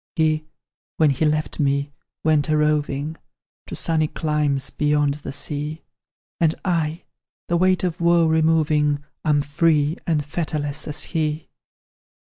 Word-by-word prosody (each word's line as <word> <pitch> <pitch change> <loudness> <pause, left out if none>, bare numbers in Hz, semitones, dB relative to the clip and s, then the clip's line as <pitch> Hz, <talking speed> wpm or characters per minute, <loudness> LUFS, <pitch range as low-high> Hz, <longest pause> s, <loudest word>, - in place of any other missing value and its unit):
"He, 155 -2 +1 0.5
when 155 -3 +4
he 140 +4 0
left 155 0 -1
me, 140 0 +1 0.3
went 155 -1 +2
a 155 - +3
roving 150 0 0 0.5
To - - -6
sunny 155 -2 +1
climes, 150 -3 -1
beyond 150 -1 +1
the - - -5
sea; 150 +2 -4 0.6
And 165 -1 +3
I, 165 -3 0 0.5
the 170 - +2
weight 185 +1 +3
of 175 -2 -2
woe 170 0 +4
removing, 155 -2 +2 0.2
Am 145 -2 +2
free 150 +1 +2
and 150 -4 +1
fetterless 150 -2 -3
as 150 +1 -4
he. 155 -2 -2
155 Hz, 130 wpm, -22 LUFS, 145-160 Hz, 0.6 s, when